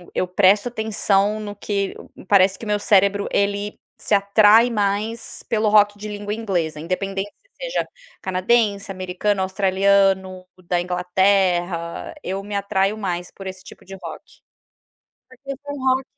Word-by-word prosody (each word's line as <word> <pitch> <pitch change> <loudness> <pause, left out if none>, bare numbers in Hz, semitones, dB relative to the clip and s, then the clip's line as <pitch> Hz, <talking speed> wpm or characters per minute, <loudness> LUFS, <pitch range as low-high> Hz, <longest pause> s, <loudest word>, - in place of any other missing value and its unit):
eu - - +1
presto 200 +5 +3
atenção 215 -2 +1
no 205 -1 -6
que 200 -1 -2
hum - - -12
hum, - - -14
parece 190 0 +4
que - - -9
meu 210 -1 0
cérebro 200 0 +3
ele 200 +1 -1 0.2
se - - -3
atrai 210 +3 +5
mais 210 +1 -2
pelo 220 -1 +1
rock 205 -1 +4
de 215 - -6
língua 205 0 -5
inglesa, 180 -9 -2
independente 195 +4 -3 0.2
se - - -34 0.2
seja - - -1 0.3
canadense, 200 +2 +1
americano, 185 +2 -1
australiano, 190 -1 +2 0.2
da 175 0 0
Inglaterra, 180 -1 0
eu 190 +2 -3
me 205 0 -6
atraio 200 +1 0
mais 180 -4 -3
por 195 - -12
esse 190 0 -7
tipo - - -14
de 195 - -9
rock. 165 - -8 1.1
Porque 265 +2 -8
foi 285 0 -6
rock 260 0 +1
200 Hz, 150 wpm, -21 LUFS, 190-210 Hz, 1.1 s, atrai